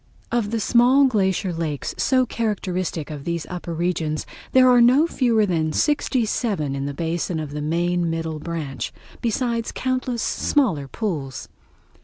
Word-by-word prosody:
Of 235 Hz, -3 st, 0 dB
the 230 Hz, +1 st, -1 dB
small 245 Hz, +5 st, +5 dB
glacier 190 Hz, -6 st, +1 dB
lakes 160 Hz, -4 st, -3 dB
so 255 Hz, -1 st, +2 dB
characteristic 185 Hz, -9 st, -2 dB
of 145 Hz, -2 st, -6 dB
these 170 Hz, 0 st, -2 dB
upper 175 Hz, -1 st, -5 dB
regions, 165 Hz, -2 st, -1 dB, 0.3 s
there 255 Hz, 0 st, +6 dB
are 245 Hz, -1 st, +6 dB
no 255 Hz, +6 st, +6 dB
fewer 235 Hz, -9 st, +2 dB
than 160 Hz, -4 st, 0 dB
sixty 290 Hz, -, +1 dB
seven 200 Hz, -, -1 dB
in 140 Hz, 0 st, -3 dB
the 145 Hz, -, -4 dB
basin 165 Hz, +1 st, -2 dB
of 150 Hz, -2 st, -5 dB
the 150 Hz, 0 st, -4 dB
main 170 Hz, +2 st, 0 dB
middle 165 Hz, -1 st, -3 dB
branch, 150 Hz, -7 st, -4 dB, 0.3 s
besides 235 Hz, 0 st, -1 dB
countless 255 Hz, -2 st, -2 dB
smaller 195 Hz, -, +1 dB
pools. 145 Hz, -, -4 dB
180 Hz, 150 wpm, -23 LUFS, 160-240 Hz, 0.3 s, there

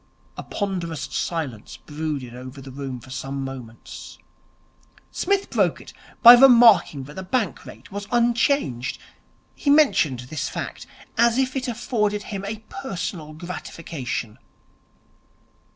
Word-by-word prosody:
A -, -, -6 dB
ponderous 175 Hz, -8 st, -3 dB
silence 135 Hz, -3 st, -4 dB
brooded 150 Hz, -5 st, -5 dB
over 130 Hz, +2 st, -9 dB
the 135 Hz, 0 st, -10 dB
room 135 Hz, -1 st, -6 dB
for 130 Hz, +2 st, -14 dB
some 135 Hz, +1 st, -4 dB
moments. 125 Hz, -4 st, -9 dB, 0.9 s
Psmith 395 Hz, +1 st, 0 dB
broke -, -, +2 dB
it -, -, -13 dB, 0.3 s
by 240 Hz, 0 st, +13 dB
remarking 235 Hz, -, +7 dB
that 145 Hz, +3 st, -11 dB
the 190 Hz, -, -5 dB
Bank 205 Hz, +4 st, -2 dB
Rate -, -, -13 dB
was 200 Hz, +1 st, -6 dB
unchanged. 235 Hz, -, +1 dB, 0.6 s
He 290 Hz, -, -2 dB
mentioned 265 Hz, -, +4 dB
this 130 Hz, +5 st, -4 dB
fact -, -, -6 dB, 0.3 s
as 235 Hz, 0 st, +4 dB
if 260 Hz, 0 st, 0 dB
it 260 Hz, -1 st, -2 dB
afforded 215 Hz, -3 st, -1 dB
him 200 Hz, -2 st, -6 dB
a 215 Hz, +2 st, -5 dB
personal 180 Hz, -, -5 dB
gratification. 155 Hz, -8 st, -6 dB
170 Hz, 125 wpm, -23 LUFS, -, 0.9 s, by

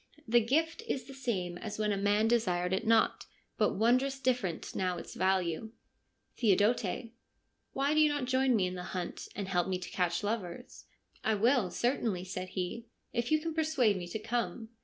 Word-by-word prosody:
The 240 Hz, +1 st, +5 dB
gift 320 Hz, -, +1 dB
is 265 Hz, -, -1 dB
the 270 Hz, +3 st, -11 dB
same 190 Hz, -10 st, -3 dB
as 210 Hz, -1 st, -5 dB
when 210 Hz, -1 st, +1 dB
a -, -, +1 dB
man 205 Hz, +2 st, +2 dB
desired 185 Hz, -6 st, +1 dB
it 205 Hz, +4 st, -1 dB
not; 225 Hz, 0 st, +3 dB, 0.3 s
but -, -, +2 dB
wondrous 255 Hz, +6 st, +2 dB
different 245 Hz, -10 st, -1 dB
now 180 Hz, -2 st, 0 dB
its -, -, -8 dB
value.' 190 Hz, +2 st, 0 dB, 0.7 s
Theodote: 215 Hz, 0 st, +2 dB, 0.3 s
' -, -, -48 dB
Why 275 Hz, +2 st, +1 dB
do 310 Hz, -, +3 dB
you 305 Hz, -1 st, +6 dB
not 290 Hz, -3 st, -1 dB
join 260 Hz, 0 st, +3 dB
me 195 Hz, -4 st, +2 dB
in 180 Hz, -, -3 dB
the 180 Hz, -, -5 dB, 0.2 s
hunt, 175 Hz, -1 st, -4 dB
and 200 Hz, -1 st, -3 dB
help 180 Hz, -2 st, +1 dB
me 185 Hz, -1 st, 0 dB
to 180 Hz, -1 st, -8 dB
catch 175 Hz, 0 st, 0 dB
lovers? 205 Hz, +1 st, -4 dB
' -, -, -48 dB
' -, -, -30 dB
I 220 Hz, -, +2 dB
will, 230 Hz, -1 st, +3 dB
certainly,' 225 Hz, -4 st, 0 dB
said 185 Hz, 0 st, -5 dB
he, 225 Hz, +6 st, -3 dB
' -, -, -45 dB
if 235 Hz, +2 st, -1 dB
you 310 Hz, -, +5 dB
can 325 Hz, 0 st, -3 dB
persuade 305 Hz, -9 st, +2 dB
me 180 Hz, -2 st, -5 dB
to 175 Hz, -, -4 dB
come.' 225 Hz, -1 st, -3 dB
220 Hz, 200 wpm, -31 LUFS, 185-250 Hz, 0.7 s, you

